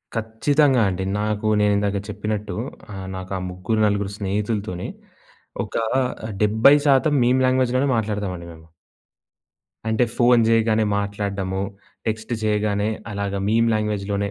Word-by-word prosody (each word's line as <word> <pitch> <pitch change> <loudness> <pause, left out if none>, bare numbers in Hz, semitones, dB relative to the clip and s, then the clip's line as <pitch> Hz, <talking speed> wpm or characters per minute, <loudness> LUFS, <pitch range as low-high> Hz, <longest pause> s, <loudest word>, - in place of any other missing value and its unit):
ఖచ్చితంగా 125 +4 +2
అండి. 95 0 -3 0.2
నాకు 105 0 -1
నేనిందాక 100 -1 +2
చెప్పినట్టు 105 -2 -3 0.4
ఆహ్, 95 -1 -6
నాకు 95 0 -7
ఆ - - -3
ముగ్గురు 90 +5 -2
నలుగురు 100 -1 0
స్నేహితులతోనే 100 -2 -2 0.8
ఒక - - -12 0.7
70% 140 +7 +4
మీమ్ 125 +2 +3
లాంగ్వేజ్‌లోనే 130 +1 +2
మాట్లాడతామండి 100 -5 -2
మేము. 80 0 -16 1.2
అంటే, 110 +2 +2
ఫోను 120 -1 +5
జేయగానే 110 -1 +3
మాట్లాడ్డము, 100 -2 -2 0.5
టెక్స్ట్ 110 +2 -2
జేయగానే 105 -1 +1 0.2
అలాగా 100 -1 -2
మీమ్ 115 +2 +3
లాంగ్వేజ్‌లోనే 100 -1 -1
105 Hz, 110 wpm, -22 LUFS, 100-115 Hz, 1.2 s, ఫోను